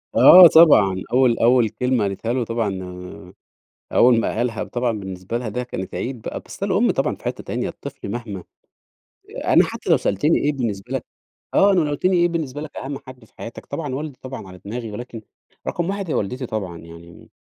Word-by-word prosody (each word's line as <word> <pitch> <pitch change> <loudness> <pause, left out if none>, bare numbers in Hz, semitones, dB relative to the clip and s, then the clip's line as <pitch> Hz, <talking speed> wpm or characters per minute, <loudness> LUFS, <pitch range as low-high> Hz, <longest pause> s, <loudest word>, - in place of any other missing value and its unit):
آه 180 -1 +10
طبعًا. 105 - +5
أول 125 -2 +4
أول 120 -1 +4
كلمة 125 -2 0
قالتها 100 +4 -2
له 125 -2 0
طبعًا 110 -5 -2 1.1
أول 120 -2 +5
ما - - -2
قالها 120 -2 -1
طبعًا 120 -1 -1
بالنسبة 95 +3 -5
لها 120 -3 -4
ده 125 +4 -3
كانت 95 -6 -6
عيد 125 -2 -4
بقى، - - -5
بس - - -8
الأم - - +2
طبعًا - - -1
في - - -23
حتّة - - -4
تانية، - - -3
الطفل - - -9
مهما 105 -7 -6 1.0
أنا - - +5
حتّى - - -6
لو - - +6
سألتني 125 - +1
إيه 150 0 0
بالنسبة 115 -3 -4
لك 130 - -3 0.5
آه. 200 0 +5
أنا 180 - +3
لو 150 -2 0
قُلت 145 - -5
لي 185 - +3
إيه 175 0 +3
بالنسبة 150 -4 -4
لك 155 -2 -9
أهَم 135 +1 -5
حد 130 -3 -12
في - - -25
حياتك، 115 - -9
طبعًا 145 -2 -4
والدي 145 -1 -6
طبعًا 130 -7 -8
على 90 0 -12
دماغي 115 +2 -5
ولكن 115 0 -8 0.5
رقم 175 +1 -2
1 195 -3 -4
هي - - 0
والدتي 125 +5 -2
طبعًا 95 -7 -5
يعني، 85 0 -14
120 Hz, 195 wpm, -21 LUFS, 105-140 Hz, 1.1 s, آه